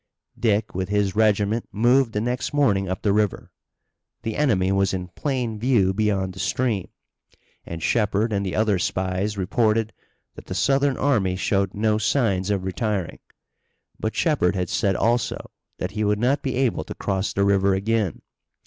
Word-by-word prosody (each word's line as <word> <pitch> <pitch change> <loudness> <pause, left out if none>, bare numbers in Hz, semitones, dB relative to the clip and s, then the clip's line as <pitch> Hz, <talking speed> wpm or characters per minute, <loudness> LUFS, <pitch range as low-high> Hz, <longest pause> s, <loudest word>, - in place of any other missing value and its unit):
Dick, 105 -3 +1
with 95 +1 -3
his 100 -1 0
regiment, 110 +1 +1
moved 120 +2 +3
the 105 - -1
next 125 +4 -2
morning 100 -10 +2
up 95 - -4
the 100 -2 +2
river. 105 -2 -1 0.7
The 110 -1 -3
enemy 95 -11 +2
was 95 -1 +1
in 90 -1 -5
plain 120 - -3
view 110 -6 +2
beyond 100 -2 0
the 95 - -11
stream, 110 -1 -1 0.8
and 80 -1 -6
Shepard 110 0 +1
and 100 -1 0
the 95 -3 -3
other 105 -3 +2
spies 95 +3 -1
reported 110 +3 +1 0.4
that - - -13
the - - -5
Southern 140 0 +2
army 105 -10 +1
showed 95 0 0
no 105 +1 +1
signs 105 -4 +1
of 100 -2 0
retiring. 95 -1 -2 0.8
But - - -3
Shepard 90 +2 +1
had 90 -2 -2
said 100 -2 +1
also 120 +4 0 0.3
that - - -4
he 110 0 -2
would 105 0 +2
not 125 +6 +1
be 130 -2 -2
able 130 -2 0
to - - -7
cross 95 0 -2
the 100 - +1
river 100 -1 +3
again. 105 -3 -1
105 Hz, 165 wpm, -23 LUFS, 95-115 Hz, 0.8 s, moved